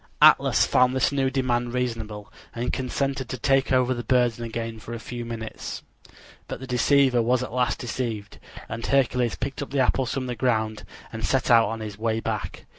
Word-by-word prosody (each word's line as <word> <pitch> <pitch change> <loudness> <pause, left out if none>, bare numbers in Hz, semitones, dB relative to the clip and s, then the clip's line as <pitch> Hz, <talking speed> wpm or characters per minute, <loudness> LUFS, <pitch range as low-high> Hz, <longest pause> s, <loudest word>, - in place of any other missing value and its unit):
Atlas - - +6
found 125 +1 +3
this 130 - +2
new 135 -2 +1
demand 125 -2 -1
reasonable, 110 -4 -4 0.2
and 120 +1 -2
consented 135 0 -2
to 130 - -4
take 135 +2 +2
over 130 -1 +3
the 120 -1 -5
burden 120 -2 +2
again 115 -1 -4
for 115 +2 -7
a - - -6
few 120 +1 -6
minutes. 115 -1 -6 0.6
But - - -5
the 130 - -7
deceiver 130 0 +3
was 125 +2 +2
at 125 - -7
last 125 -1 +1
deceived, 115 -4 -4 0.3
and 115 0 -6
Hercules 125 -3 +1
picked 135 +1 -4
up 145 - -5
the 140 - -1
apples 130 0 +1
from 130 0 -2
the 125 - -3
ground 110 -4 0 0.3
and 115 0 -5
set 130 -2 +1
out 115 -3 +6
on 115 0 -4
his 105 -1 -7
way 110 0 0
back. 110 -2 -4
120 Hz, 190 wpm, -25 LUFS, 115-130 Hz, 0.6 s, Atlas